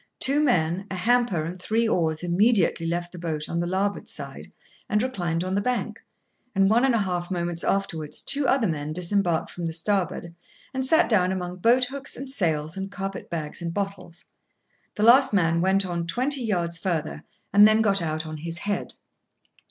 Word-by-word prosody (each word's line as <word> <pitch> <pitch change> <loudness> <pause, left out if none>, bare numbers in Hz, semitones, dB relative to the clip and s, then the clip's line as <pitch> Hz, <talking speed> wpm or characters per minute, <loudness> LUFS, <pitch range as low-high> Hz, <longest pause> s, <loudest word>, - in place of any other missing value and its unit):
Two 275 +2 +4
men, 190 - +1
a 190 - -4
hamper, 210 -4 +1
and 180 +2 -7
three 225 +4 +1
oars 160 -5 0
immediately 180 -2 +2
left 175 +1 -2
the 180 - -10
boat 155 -3 -4
on 170 - -2
the 175 - -1
larboard 195 +3 -2
side, - - -6 0.4
and 210 0 +2
reclined 175 -10 -2
on 185 +1 -3
the 200 - +1
bank, 250 +3 -2 0.6
and 195 +1 +3
one 235 +3 +4
and 265 -3 +3
a 225 - +2
half 180 -2 -2
moments 175 -2 -1
afterwards, 160 -6 -1
two 280 -1 +2
other 250 -3 +2
men 155 -2 -3
disembarked 180 -1 0
from 175 -1 -4
the 165 - -3
starboard, 170 -1 -1 0.4
and 260 0 -1
sat 315 +5 +4
down 185 -5 +2
among 180 -1 -4
boat 240 +6 +3
hooks 275 +2 -4
and 265 +1 -4
sails 160 - -1
and 195 0 -5
carpet 195 -1 -6
bags 155 -2 -4
and 170 0 -4
bottles. 195 -4 -5 0.7
The 210 - -1
last 260 +2 +7
man 165 -3 +2
went 190 +2 +2
on 170 -2 -3
twenty 260 +9 -1
yards 170 -6 -1
further, 160 -4 -2 0.3
and 205 +1 +8
then 215 +1 +3
got 195 -3 +2
out 155 -1 -2
on 155 0 -6
his 165 +2 -4
head. 205 +3 -3
185 Hz, 190 wpm, -25 LUFS, 170-215 Hz, 0.7 s, and